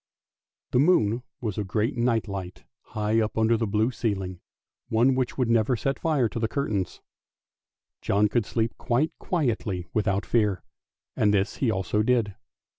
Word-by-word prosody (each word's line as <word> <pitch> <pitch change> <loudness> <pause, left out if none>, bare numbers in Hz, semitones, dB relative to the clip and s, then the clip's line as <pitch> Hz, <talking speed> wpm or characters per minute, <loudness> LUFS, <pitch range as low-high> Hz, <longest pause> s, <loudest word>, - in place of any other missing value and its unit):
The 125 - +3
moon 125 - +3 0.2
was 110 -4 -3
a - - 0
great 110 +7 -1
night 120 -2 +1
light 95 -3 -6 0.3
high 105 +1 +2
up 110 0 -2
under 110 +1 +3
the 115 0 -1
blue 110 +4 +1
ceiling, 95 -6 -3 0.5
one 120 +4 +4
which 130 -1 -1
would 125 -3 +1
never 115 +1 +3
set 135 +4 -2
fire 150 -7 +2
to 115 - -4
the 110 - +1
curtains. 110 -8 -2 1.0
John 105 +1 +2
could 105 0 0
sleep 115 0 -1
quite 130 +7 +1
quietly 110 - -1
without 100 -2 0
fear, 105 -5 +1 0.5
and 105 - +3
this 100 +1 0
he 130 - +1
also 105 0 0
did. 115 -3 +1
110 Hz, 160 wpm, -26 LUFS, 105-120 Hz, 1.0 s, one